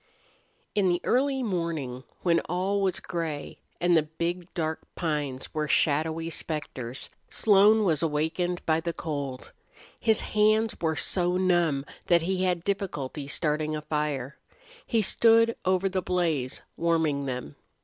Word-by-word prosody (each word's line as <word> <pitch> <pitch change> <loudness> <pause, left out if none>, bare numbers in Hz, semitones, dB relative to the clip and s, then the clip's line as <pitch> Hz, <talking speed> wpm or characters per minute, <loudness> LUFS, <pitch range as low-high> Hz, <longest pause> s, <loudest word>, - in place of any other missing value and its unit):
II - - -36 0.2
In 190 - +3
the 175 0 +2
early 265 +1 +1
morning 165 - -2 0.2
when 170 -2 +4
all 190 +3 0
was 190 -2 +1
gray 160 -4 -4 0.2
and 175 0 +3
the 160 - +6
big, 170 +3 -4
dark 160 -2 -1 0.2
pines 145 -5 -3
were 155 -1 -1
shadowy 160 +3 +2
specters, 135 -6 -3 0.2
Slone 210 +1 +5
was 160 -7 +2
awakened 165 +3 -1
by 160 0 +2
the 170 +1 -3
cold. 140 -6 -5 0.5
His 220 -2 +2
hands 215 +1 +2
were 160 -1 +1
so 180 +4 +1
numb 175 -7 +2 0.2
that 170 -2 +4
he 185 +1 0
had 175 -2 0
difficulty 155 -8 -3
starting 155 +1 -1
a 150 - -4
fire. 145 -4 -2 0.5
He 225 -3 +2
stood 230 +2 +4
over 185 +1 +2
the 190 -1 -1
blaze, 165 -8 -1
warming 160 -4 +1
them. 125 - -5
165 Hz, 140 wpm, -27 LUFS, 150-185 Hz, 0.5 s, the